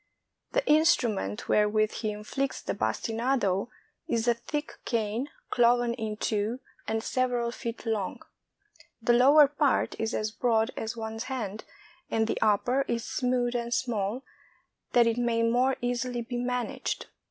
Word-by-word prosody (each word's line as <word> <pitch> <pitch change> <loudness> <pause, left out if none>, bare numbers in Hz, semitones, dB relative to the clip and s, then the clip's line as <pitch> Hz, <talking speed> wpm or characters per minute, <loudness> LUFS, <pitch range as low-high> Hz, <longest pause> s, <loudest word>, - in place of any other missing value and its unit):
The - - +1
instrument 245 - +2
wherewith 215 +1 +3
he 220 -1 -3
inflicts 215 +6 -3
the - - -3
bastinado 230 -3 0 0.4
is 230 0 0
a 240 - +5
thick 295 +6 -5
cane, 230 +4 -1 0.2
cloven 240 0 +3
in 220 -3 -4
two, 215 +3 -1 0.3
and 220 0 -1
several 245 -2 0
feet 235 -1 -6
long. 215 -4 -2 0.8
The 240 +1 +3
lower 280 +5 +7
part 290 -1 +1
is 225 +1 -1
as 215 0 -1
broad 225 0 +1
as 225 +1 -4
one's 225 +1 -4
hand, 220 -6 -4 0.4
and 225 0 +1
the 225 - -2
upper 225 +5 +3
is 230 -1 -1
smooth 250 -1 0
and 235 0 -2
small, 230 0 -1 0.7
that 240 -1 +6
it 230 0 +1
may 235 -1 +1
more 250 +3 +3
easily 245 0 -1
be 245 +1 -4
managed. 245 0 -2
235 Hz, 140 wpm, -28 LUFS, 220-250 Hz, 0.8 s, lower